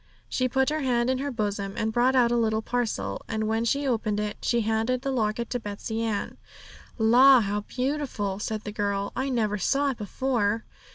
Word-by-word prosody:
She 255 0 0
put 265 +2 +2
her 310 - -1
hand 250 -3 +1
in 260 - -1
her 285 +1 -2
bosom, 205 -4 -3
and 220 0 -1
brought 250 +3 +3
out 240 -2 +4
a - - +2
little 220 -2 +1
parcel, 215 - -2
and 220 -1 -2
when 225 +1 0
she 280 +5 +1
had 275 - 0
opened 215 -3 0
it 210 -1 -3
she 235 -1 +1
handed 225 +3 0
the 275 - -1
locket 230 -1 -1
to 245 - -1
Betsey 220 +1 -4
Ann. 220 -3 -2 0.6
'La, 250 +4 +7
how 205 0 -1
beautiful!' 250 -6 -2
said 215 0 -3
the 210 - -5
girl; 200 -1 -1
'I 265 +1 -1
never 215 -5 0
saw 280 +8 +1
it 250 - -9
before.' 225 0 -1
225 Hz, 205 wpm, -26 LUFS, 210-255 Hz, 0.6 s, La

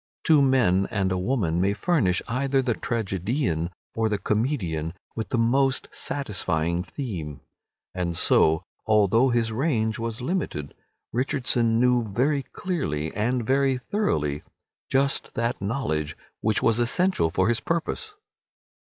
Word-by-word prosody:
Two 155 -3 +5
men 120 -9 +3
and 95 -4 0
a 95 - 0
woman 90 -6 0
may 100 +2 +2
furnish 105 - +1
either 135 +2 +1
the 125 -2 +1
tragedian 100 - -1 0.2
or 115 -1 0
the 105 - 0
comedian 100 - -1 0.2
with 110 -3 -4
the 130 - 0
most 130 +3 +2
satisfying 85 - -1
theme. 90 - -6 0.5
And 85 -2 -2
so, 80 +2 +4 0.2
although 110 +4 +4
his 115 -2 +1
range 110 -4 0
was 115 0 -3
limited, 125 - -3 0.4
Richardson 120 -2 +1
knew 125 -1 +3
very 130 +8 0
clearly 130 - -3
and 120 +3 0
very 135 0 +2
thoroughly 75 - -1 0.5
just 135 +1 +1
that 115 -1 -1
knowledge 85 - -2 0.2
which 110 -1 +1
was 115 0 +3
essential 120 - +2
for 90 - +1
his 120 -1 +2
purpose. 170 - -3
115 Hz, 130 wpm, -25 LUFS, 95-135 Hz, 0.5 s, Two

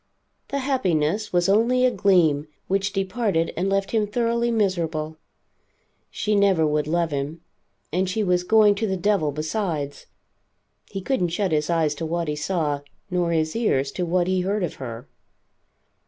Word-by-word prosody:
The 280 - -3
happiness 210 - 0
was 175 0 +2
only 235 +5 +3
a 255 - +4
gleam, 160 -9 +3 0.2
which 195 +1 0
departed 195 -3 -1
and 185 +3 0
left 195 0 0
him 215 -2 +1
thoroughly 235 +2 0
miserable. 165 -8 -1 0.9
She 210 0 -1
never 195 -5 +3
would 150 0 0
love 170 0 0
him, 145 +3 -3 0.5
and 185 +1 +1
she 215 +4 0
was 180 -2 +1
going 215 +1 +5
to 220 - +1
the 190 -1 -1
devil, 180 -5 +1
besides. 155 -2 -3 0.8
He 195 - -5
couldn't 185 -6 0
shut 185 +2 -1
his 150 0 0
eyes 160 -3 +2
to 160 +2 -4
what 170 0 -2
he 150 - -1
saw, 150 -2 -1 0.3
nor 175 -1 +1
his 160 -1 0
ears 140 - +1
to 180 - -3
what 175 +1 +1
he 185 0 +1
heard 200 +2 -1
of 175 - -2
her. 120 +1 -7
180 Hz, 165 wpm, -24 LUFS, 155-205 Hz, 0.9 s, going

